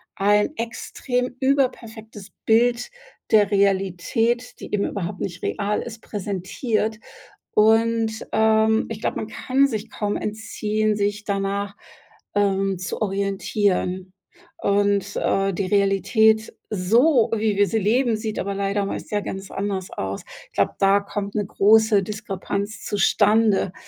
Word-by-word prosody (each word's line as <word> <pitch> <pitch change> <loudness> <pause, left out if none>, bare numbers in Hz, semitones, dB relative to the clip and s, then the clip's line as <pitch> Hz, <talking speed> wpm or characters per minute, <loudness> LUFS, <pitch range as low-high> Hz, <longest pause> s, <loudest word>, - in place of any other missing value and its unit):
ein 205 +5 +2
extrem 245 +2 -3
überperfektes 230 -6 -1
Bild 240 - +3 0.4
der 210 -2 +5
Realität, 200 +5 +1
die - - -9
eben 205 -1 +1
überhaupt 190 0 -4
nicht 175 -1 -5
real 205 +1 -1
ist, 225 -1 -8
präsentiert. 210 +3 -2 0.6
Und, 225 +1 +2
ähm, 220 0 +3
ich 220 -1 -6
glaube, - - -1
man 215 - -4
kann 265 +5 +1
sich 220 -3 -4
kaum 205 -1 -2
entziehen, 215 0 -1
sich 205 +1 -1
danach, 200 0 -2 0.6
ähm, 195 -1 +1
zu 185 - -5
orientieren. 195 -2 -1 0.5
Und, 200 0 +1
äh, 195 0 +1
die 190 +2 -2
Realität, 210 +3 +2 0.2
so 230 - +3
wie 215 -2 0
wir 205 0 +4
sie 225 - 0
leben, 230 +3 +2
sieht 215 -1 -4
aber 200 - -2
leider 200 +1 -1
meist - - -6
ja 210 - +1
ganz 195 -1 -6
anders 195 -2 -3
aus. 95 0 -4 0.2
Ich - - -43
glaube, - - +1
da 195 +1 +4
kommt 200 0 -5
'ne 205 -1 0
große 215 +1 +4
Diskrepanz 205 0 -4
zustande, 205 -1 +2
210 Hz, 130 wpm, -23 LUFS, 195-220 Hz, 0.6 s, der